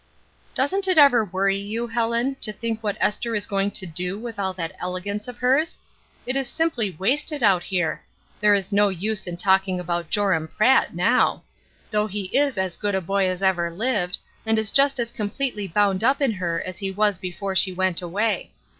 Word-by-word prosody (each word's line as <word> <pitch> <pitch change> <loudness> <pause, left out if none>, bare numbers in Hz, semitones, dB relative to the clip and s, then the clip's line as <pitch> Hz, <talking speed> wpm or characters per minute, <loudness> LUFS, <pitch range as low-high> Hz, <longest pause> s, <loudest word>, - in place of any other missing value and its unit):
"Doesn't 380 +9 +2
it 370 -3 +2
ever 275 -6 +6
worry 195 0 0
you, 215 +4 -3
Helen, 235 +3 0
to 215 - 0
think 225 0 -4
what 210 -2 -2
Esther 225 +2 0
is 205 - +1
going 195 -1 0
to 195 -1 -2
do 180 +3 -2
with 225 -1 -7
all 190 -1 0
that 165 -3 -5
elegance 195 +4 -4
of 250 -1 -8
hers? 270 +7 +1 0.5
It 255 - -2
is 270 -2 -1
simply 245 - 0
wasted 285 - 0
out 190 -4 +4
here; 175 -3 -2 0.4
there 210 -1 +5
is 195 0 -1
no 205 0 +4
use 200 +3 -1
in 175 -1 -4
talking 190 0 +2
about 175 -2 -3
Joram 190 -6 +1
Pratt 225 +3 +2
now 220 +9 +2
I - - -36
though 210 0 +1
he 200 -2 -5
is 280 -4 +2
as 190 -2 -1
good 205 -2 -1
a - - +1
boy 195 +2 0
as 185 +1 -3
ever 175 -3 +2
lived, 185 -1 -1 0.3
and 220 0 +1
is 220 -1 +1
just 275 -1 +4
as 235 -1 -1
completely 210 -1 -3
bound 195 +2 +1
up 265 +4 +3
in 275 -4 +2
her 175 -4 -2
as 185 - -5
he 195 -2 -2
was 205 -1 +1
before 190 +2 -5
she 190 0 +5
went 185 -1 0
away. 205 +6 -1
205 Hz, 200 wpm, -23 LUFS, 185-235 Hz, 0.5 s, ever